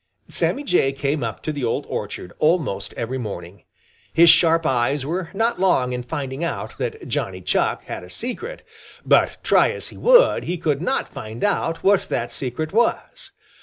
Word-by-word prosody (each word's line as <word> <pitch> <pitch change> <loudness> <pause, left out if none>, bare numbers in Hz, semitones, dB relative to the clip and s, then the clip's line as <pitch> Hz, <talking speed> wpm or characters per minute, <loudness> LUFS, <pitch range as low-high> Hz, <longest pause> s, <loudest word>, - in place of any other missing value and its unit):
Sammy 285 - +1
Jay 135 - +2
came 140 +1 -1
up 110 -3 -5
to 155 - -2
the 145 -3 -4
old 115 - -1
orchard 90 - -5
almost 150 - +1
every 125 +3 -3
morning. 95 -5 -7 0.5
His 170 0 +7
sharp 165 0 +3
eyes 130 +1 +1
were 170 +3 -3
not 225 +2 0
long 130 -10 +2
in 125 - -3
finding 135 +3 -4
out 170 - -4
that 455 -2 -4
Johnny - - -2
Chuck - - 0
had - - -6
a - - -12
secret, 430 - -6 0.4
but - - +3
try - - +4
as - - -5
he - - -13
would - - +5
he 180 - -2
could 150 -3 -1
not 180 - 0
find 110 +2 -7
out 165 -5 0
what 200 0 +3
that - - -2
secret 140 +6 -4
was. 235 +2 0
155 Hz, 175 wpm, -22 LUFS, 125-185 Hz, 0.5 s, His